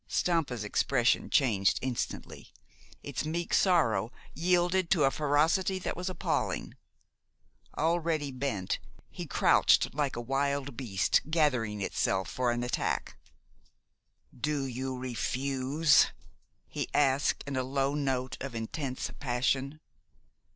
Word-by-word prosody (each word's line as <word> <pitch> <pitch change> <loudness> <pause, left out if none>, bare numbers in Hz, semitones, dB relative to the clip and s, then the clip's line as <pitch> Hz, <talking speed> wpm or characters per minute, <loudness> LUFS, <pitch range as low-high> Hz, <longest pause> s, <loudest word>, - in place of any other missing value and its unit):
Stampa's 150 -10 0
expression 120 +4 +1
changed 105 -9 +3
instantly. 130 -2 -4 0.5
Its - - -3
meek 165 +2 -3
sorrow 120 - +3 0.2
yielded 180 +1 +2
to 170 -6 +3
a 135 - +4
ferocity 155 +7 +2
that 185 - -3
was 180 +1 -3
appalling. 185 - -2 1.0
Already 160 -2 0
bent, 125 -8 -2 0.3
he - - -7
crouched - - +4
like 145 -2 -1
a - - -4
wild 140 +2 -1
beast 110 -7 +1
gathering 125 -10 +1
itself 95 0 0
for 125 -1 0
an 120 0 -1
attack. 125 - -2 1.2
"Do 145 +1 -1
you 130 0 -4
refuse?" 135 +4 +2 0.6
he - - -4
asked, 140 -1 +2
in 140 -1 -4
a 130 - +1
low 135 +2 0
note 130 -3 -1
of 135 -2 -5
intense 130 +4 -4
passion. 135 +3 -1
135 Hz, 115 wpm, -30 LUFS, 125-155 Hz, 1.2 s, a